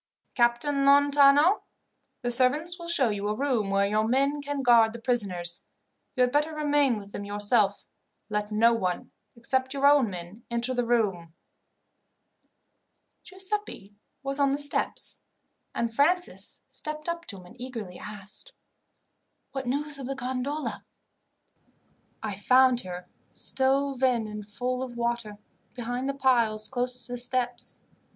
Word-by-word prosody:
"Captain 245 +4 +2
Lontano, 285 +5 +5 0.6
the 245 - 0
servants 295 +8 +2
will 340 - -7
show 285 -8 +2
you 205 0 -3
a 210 - -1
room 250 -6 0
where 195 0 +2
your 215 +2 +1
men 275 +4 +1
can 285 -1 -3
guard 230 -3 +5
the 235 - -7
prisoners. 195 -8 -1 0.6
You 255 - 0
had 250 0 +4
better 300 +3 +1
remain 290 -5 +2
with 200 -1 -10
them 200 - -6
yourself. 205 0 +1 0.4
Let 210 -1 -2
no 230 +2 +4
one, 185 -6 -2 0.2
except 260 +3 -1
your 275 0 +1
own 285 -5 +5
men, 180 +4 -9
enter 235 +2 +1
the 245 -2 -1
room." 190 -9 0 1.9
Giuseppi 380 - -3 0.3
was 275 +1 -2
on 275 -1 +3
the - - 0
steps, 285 0 0 0.6
and 235 -1 -1
Francis 350 +8 0
stepped 305 +1 -4
up 340 0 -3
to 200 - -4
him 180 - -13
and 235 +7 -15
eagerly 225 -8 -7
asked, 210 - -8 1.0
"What 265 -2 -5
news 285 +2 0
of 260 - -5
the 275 - -3
gondola?" 260 +3 -3 1.4
"I 205 -3 -4
found 255 +2 +5
her, 180 -3 -8 0.3
stove 270 0 0
in 245 -4 +2
and 210 0 -6
full 250 +4 -3
of 250 -2 -6
water, 235 -3 -2 0.4
behind 245 +2 -3
the 275 - -2
piles 235 -5 +2
close 250 -1 -2
to - - -10
the 245 - -2
steps. 245 0 +1
245 Hz, 145 wpm, -27 LUFS, 215-280 Hz, 1.9 s, Lontano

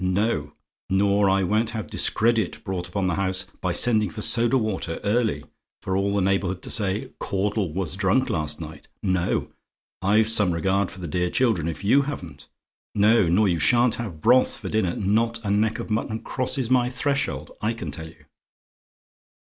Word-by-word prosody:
No; 90 -5 0 0.4
nor 100 +1 +2
I 95 0 +2
won't 110 +4 +1
have 110 - -4
discredit 115 -4 +1
brought 90 -2 -4
upon 95 +1 -2
the 90 - 0
house 95 0 +1 0.2
by 90 - -1
sending 110 0 +2
for 105 +2 -5
soda 120 +3 +4
water 105 -7 -3
early, 110 +2 0 0.4
for 95 - -2
all 100 +1 0
the 100 - +1
neighbourhood 95 -1 -1
to - - -7
say, 100 -2 +1
'Caudle 100 -2 -1
was 90 +1 -3
drunk 100 +7 +1
last 75 -2 -1
night.' 80 -1 -9 0.2
No: 95 -2 0 0.5
I've 105 +3 +3
some 105 -5 +3
regard 95 +3 0
for 95 -1 -11
the 85 - -5
dear 90 +3 -1
children, 110 -8 +1
if 85 +3 -5
you 130 +8 +4
haven't. 90 - -7 0.5
No: 105 -1 +4
nor 100 +5 +3
you 85 -3 0
shan't 120 +6 +4
have 90 -10 -7
broth 130 +8 +3
for - - -7
dinner. 105 -6 0
Not 115 +4 0
a 100 - 0
neck 110 +2 +1
of - - -6
mutton 110 +1 -2
crosses 130 -1 -2
my 125 -1 +3
threshold, 140 +3 -2
I 110 +2 0
can 90 -10 -6
tell 80 +3 -6
you. 80 - -18
100 Hz, 180 wpm, -24 LUFS, 90-110 Hz, 0.5 s, soda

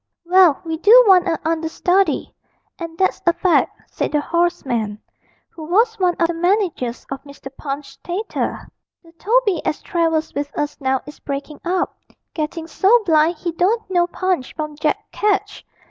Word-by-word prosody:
'Well, 355 -4 +5
we 320 -1 -3
do 465 +7 +8
want 370 -2 +6
a 325 - +1
understudy, 330 +1 0 0.5
and 330 -1 -7
that's 380 +1 +1
a 340 - +6
fact,' 365 -1 +1
said - - -2
the 300 - +3
hoarse 340 +2 0
man, 220 -5 -2 0.5
who 325 - -12
was 445 +7 +2
one 360 -2 +2
of 335 - +3
the 345 - -2
managers 345 - -1
of 270 - -4
Mr. 280 -1 -12
Punch's 275 -1 -6
Theatre. 385 +5 -3 0.4
'The 335 - -18
Toby 420 -5 +1
as - - -1
travels 325 -2 0
with 285 0 -3
us 295 0 -3
now 265 -1 0
is 295 - -12
breakin' 285 +1 -6
up, 360 +1 -1 0.3
getting 320 +1 -4
so 405 +8 +3
blind 320 0 +3
he 340 +2 -4
don't 385 +7 0
know 350 -1 +3
Punch 360 -6 -2
from 305 -1 -5
Jack 300 0 -2
Ketch. 410 -2 -1
335 Hz, 165 wpm, -20 LUFS, 300-370 Hz, 0.5 s, do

